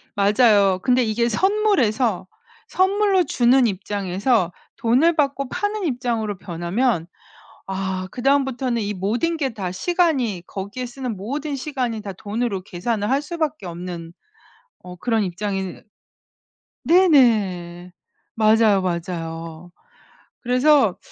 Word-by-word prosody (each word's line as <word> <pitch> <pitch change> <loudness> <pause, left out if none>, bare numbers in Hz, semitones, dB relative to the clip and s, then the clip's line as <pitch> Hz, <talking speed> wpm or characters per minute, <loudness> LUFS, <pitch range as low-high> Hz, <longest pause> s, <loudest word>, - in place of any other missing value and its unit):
맞아요. 200 -2 +4
근데 250 -1 +3
이게 235 +2 0
선물에서 255 - +1 0.4
선물로 385 0 +2
주는 250 -2 +3
입장에서 195 0 -1 0.3
돈을 270 +9 +3
받고 275 -2 0
파는 415 0 -2
입장으로 235 - -2
변하면 175 +2 -1 0.6
아 190 -1 -3
그다음부터는 260 -2 0
이 205 0 -3
모든 235 - -1
게 275 -4 -1
다 190 -5 -5
시간이 265 - 0
거기에 205 +6 -6
쓰는 245 -3 -5
모든 280 +9 -4
시간이 255 -5 -3
다 200 -2 -6
돈으로 205 0 -3
계산을 205 +4 -3
할 275 +2 +2
수밖에 310 - -3
없는 170 -1 -7 0.7
어 180 0 -10
그런 225 +3 0
입장이 190 0 -4 1.0
네네. 210 - +3 0.4
맞아요, 215 -2 +4
맞아요. 165 -1 -5 0.7
그래서 255 -3 +3
225 Hz, 250 characters per minute, -22 LUFS, 190-270 Hz, 1.0 s, 맞아요